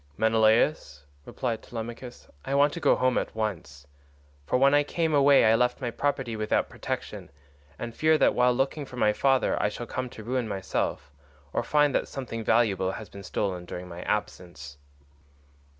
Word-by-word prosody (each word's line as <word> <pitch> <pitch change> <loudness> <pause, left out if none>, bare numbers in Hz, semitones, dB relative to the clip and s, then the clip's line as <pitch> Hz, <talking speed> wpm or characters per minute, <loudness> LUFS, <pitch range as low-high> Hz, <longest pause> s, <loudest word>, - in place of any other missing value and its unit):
"Menelaus," 110 - +2 0.2
replied 115 -4 -3
Telemachus, 120 +2 -8 0.2
"I 135 - -2
want 145 +1 +4
to 170 - -5
go 145 - +4
home 130 0 +2
at - - -6
once, 80 -11 -4 0.6
for - - +2
when 135 +2 +4
I 145 - +5
came 160 +2 -1
away 140 -3 +5
I 110 - +5
left 125 +2 +1
my 120 -3 -3
property 135 -3 -2
without 110 0 0
protection, - - -6 0.5
and 120 -1 -6
fear 155 +3 +3
that - - +3
while 125 0 +3
looking 135 +4 -1
for 125 - -11
my 105 -3 +3
father 135 +2 +1
I 105 - +2
shall 120 +3 -7
come 130 +2 -4
to 110 - -11
ruin 125 +1 -2
myself, 95 -7 -3 0.4
or - - +1
find 145 +3 +2
that - - 0
something 120 -4 -6
valuable 100 -5 +2
has 110 - -8
been 100 - -10
stolen 95 -2 -3
during 90 +1 -7
my 85 0 -8
absence." 85 -8 -4
115 Hz, 175 wpm, -27 LUFS, 105-135 Hz, 0.6 s, I